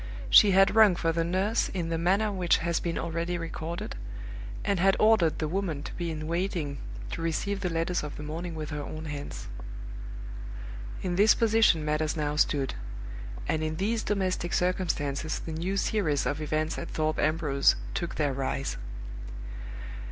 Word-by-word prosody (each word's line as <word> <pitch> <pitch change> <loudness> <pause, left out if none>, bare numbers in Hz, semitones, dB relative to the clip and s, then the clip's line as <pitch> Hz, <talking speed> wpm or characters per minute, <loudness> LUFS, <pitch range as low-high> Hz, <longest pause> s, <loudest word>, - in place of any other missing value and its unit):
She 210 - +9
had 195 +1 +5
rung 215 -4 +7
for 165 -1 +1
the 165 0 +1
nurse 190 +6 +1
in 170 -3 -1
the 165 - 0
manner 195 +5 +3
which 180 -3 +3
has 170 0 0
been 170 -1 -2
already 170 +1 -1
recorded, 165 0 -4 0.7
and 200 -3 +2
had 195 +2 +4
ordered 215 -7 +5
the 155 - -1
woman 165 -4 -1
to - - -6
be 175 -1 -3
in 155 -1 -4
waiting 165 -4 -1 0.3
to - - -3
receive 195 +5 -1
the 185 -3 -1
letters 165 +2 0
of 150 -1 -6
the 150 - -6
morning 165 +3 -4
with 155 -1 -5
her 150 0 -3
own 155 +2 -6
hands. 145 -1 -5 1.6
In 180 -1 -1
this 210 +2 +7
position 220 -8 +4
matters 150 +1 0
now 150 -1 0
stood; 140 -3 +2 0.7
and 155 - +1
in 155 0 -1
these 220 +6 0
domestic 185 -4 0
circumstances 155 -5 0
the 165 - -6
new 180 +5 -1
series 170 -9 +1
of 150 +2 -1
events 155 +1 -1
at 170 - -5
Thorpe 155 0 0
Ambrose 155 -3 +3 0.2
took 170 -1 -2
their 145 -3 +1
rise. 135 +1 -2
165 Hz, 165 wpm, -29 LUFS, 155-185 Hz, 1.6 s, She